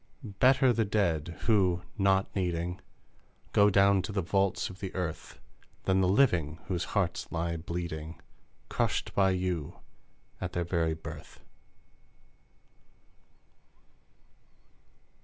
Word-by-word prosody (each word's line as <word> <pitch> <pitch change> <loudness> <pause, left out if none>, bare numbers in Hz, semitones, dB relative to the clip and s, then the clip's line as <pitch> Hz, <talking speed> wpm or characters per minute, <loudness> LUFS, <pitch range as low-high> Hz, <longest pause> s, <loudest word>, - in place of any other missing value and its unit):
Better 125 +4 +3
the 115 - +1
dead, 85 -6 0
who, 95 -5 +2
not 95 -2 +1
needing, 90 -2 -2 0.7
Go 100 0 +6
down 100 0 +4
to 105 - -5
the 95 -2 -1
vaults 95 +2 +1
of 95 - -10
the 95 -2 -5
earth, 90 -4 -4 0.5
Than 95 0 +2
the 95 - +3
living 90 - +2
whose 90 -3 -2
hearts 85 -4 -1
lie 85 0 -1
bleeding, 85 -1 -5 0.5
Crushed - - -1
by 95 -1 +3
you 90 -5 -2 0.6
at 90 -1 -4
their 85 0 -1
very 80 -2 0
birth! 80 - -10
90 Hz, 110 wpm, -30 LUFS, 85-100 Hz, 0.7 s, Go